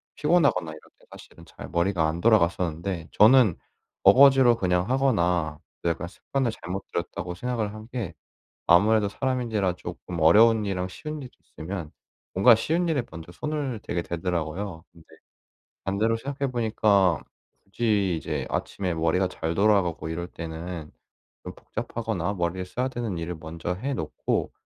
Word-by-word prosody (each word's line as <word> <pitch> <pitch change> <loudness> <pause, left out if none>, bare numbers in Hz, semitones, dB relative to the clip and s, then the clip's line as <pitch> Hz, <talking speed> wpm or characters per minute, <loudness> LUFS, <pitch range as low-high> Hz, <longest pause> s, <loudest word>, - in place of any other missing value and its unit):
피곤하거나 145 - +2
이럴 80 - -9 0.2
때 - - -23
사실은 - - -14
잘 - - -11
머리가 85 -2 +1
안 85 - -4
돌아갔었는데 85 -4 +1
저는 110 -3 +6 0.5
어거지로 130 +2 +7
그냥 90 -1 0
하거나 90 - +1 0.2
'내가 85 0 -1
습관을 125 +6 -2
잘못 95 -1 -6
들였다.'고 90 +1 -4
생각을 115 -1 -2
한 110 +1 -10
게 115 -8 -5 0.5
아무래도 105 +3 +4
사람인지라 115 -8 -1
쪼끔 90 -1 -7
어려운 110 +7 +6
일이랑 95 -2 -2
쉬운 150 +10 -7
일이 130 - -8 0.3
있으면 85 -1 -5 0.4
뭔가 115 +6 +7
쉬운 165 +10 0
일에 150 -6 +1
먼저 85 0 -9
손을 140 - -3
대게 85 - -2
되더라고요. 85 +1 -3
근데 85 -2 -20 0.8
반대로 110 +4 +1
생각해 140 +2 -3
보니까 105 -6 +2 0.4
굳이 100 -4 0
이제 80 - -3
아침에 95 -3 -2
머리가 85 +3 +1
잘 80 -2 -3
돌아가고 95 -6 +2
이럴 85 +2 -4
때는 80 -1 -7 0.5
좀 - - -8
복잡하거나 105 -5 -3
머리를 90 +1 -2
써야 125 +8 -2
되는 120 -7 -4
일을 85 0 -4
먼저 80 +3 -4
해 135 +9 -3
놓고 80 - -2
95 Hz, 340 characters per minute, -26 LUFS, 85-115 Hz, 0.8 s, 어거지로